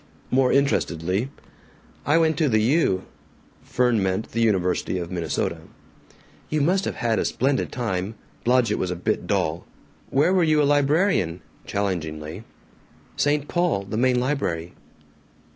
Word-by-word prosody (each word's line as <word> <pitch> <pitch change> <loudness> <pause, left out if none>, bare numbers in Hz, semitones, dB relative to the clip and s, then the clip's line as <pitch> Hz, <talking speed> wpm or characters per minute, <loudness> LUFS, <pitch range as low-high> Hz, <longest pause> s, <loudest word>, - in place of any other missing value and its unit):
More 130 0 +3
interestedly, 95 - +1 0.8
"I 150 +3 +4
went 160 -1 +3
to 155 -3 +3
the 110 -2 +3
U." 110 - +2 0.6
Fern 125 -3 +1
meant 95 +2 -1
the 115 - -1
University 95 -4 +1
of 85 0 -5
Minnesota. 85 -2 -2 0.9
"You 155 - 0
must 185 +6 +2
have - - -3
had 115 -2 0
a - - +1
splendid 135 +1 0
time. 105 -3 -3 0.3
Blodgett 120 -3 +2
was 90 - -1
a 90 - -2
bit 90 0 -2
dull." 85 -5 -1 0.4
"Where 150 +7 +3
were 185 - +3
you 155 -2 +3
a - - +4
librarian?" 145 - +2 0.3
challengingly. 85 -3 -3 0.7
"St. 145 0 +1
Paul 175 - 0
the 100 +2 -6
main 125 +2 +2
library." 90 - -2
115 Hz, 140 wpm, -24 LUFS, 90-145 Hz, 0.9 s, I